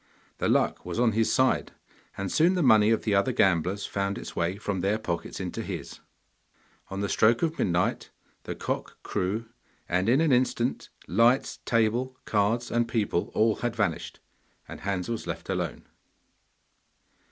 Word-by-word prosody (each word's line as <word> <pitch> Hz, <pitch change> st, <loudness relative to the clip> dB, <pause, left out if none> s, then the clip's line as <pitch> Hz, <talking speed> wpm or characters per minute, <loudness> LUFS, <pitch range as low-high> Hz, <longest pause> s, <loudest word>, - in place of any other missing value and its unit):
The -, -, +1 dB
luck -, -, +1 dB
was -, -, -4 dB
on 120 Hz, -2 st, +4 dB
his 110 Hz, +1 st, +1 dB
side, 130 Hz, 0 st, +2 dB, 0.4 s
and 100 Hz, -1 st, -3 dB
soon 170 Hz, +4 st, +4 dB
the 180 Hz, -, +1 dB
money 110 Hz, -5 st, +6 dB
of 115 Hz, -, +2 dB
the 105 Hz, -, 0 dB
other 100 Hz, 0 st, +3 dB
gamblers 95 Hz, +2 st, +1 dB
found 100 Hz, 0 st, -2 dB
its -, -, -8 dB
way 85 Hz, +2 st, 0 dB
from 100 Hz, -2 st, -3 dB
their 100 Hz, +3 st, +1 dB
pockets 85 Hz, -6 st, -4 dB
into -, -, -4 dB
his. -, -, -6 dB, 0.9 s
On 95 Hz, +1 st, -4 dB
the 100 Hz, -, 0 dB
stroke 115 Hz, +6 st, +3 dB
of 165 Hz, 0 st, -1 dB
midnight 90 Hz, -1 st, 0 dB, 0.4 s
the -, -, -4 dB
cock -, -, -4 dB
crew, 105 Hz, +5 st, -2 dB, 0.4 s
and 90 Hz, +5 st, +1 dB
in 130 Hz, +4 st, +4 dB
an 160 Hz, -2 st, +3 dB
instant 125 Hz, -1 st, +1 dB, 0.2 s
lights, 115 Hz, +7 st, +3 dB
table, 120 Hz, +3 st, +1 dB
cards, 110 Hz, +3 st, +1 dB
and 120 Hz, 0 st, +1 dB
people 110 Hz, -7 st, 0 dB
all 110 Hz, 0 st, +3 dB
had 120 Hz, -1 st, -2 dB
vanished, 100 Hz, -7 st, -2 dB, 0.5 s
and -, -, -9 dB
Hans 95 Hz, -2 st, -2 dB
was 115 Hz, -1 st, -4 dB
left -, -, -5 dB
alone. -, -, -2 dB
110 Hz, 165 wpm, -27 LUFS, 100-120 Hz, 0.9 s, money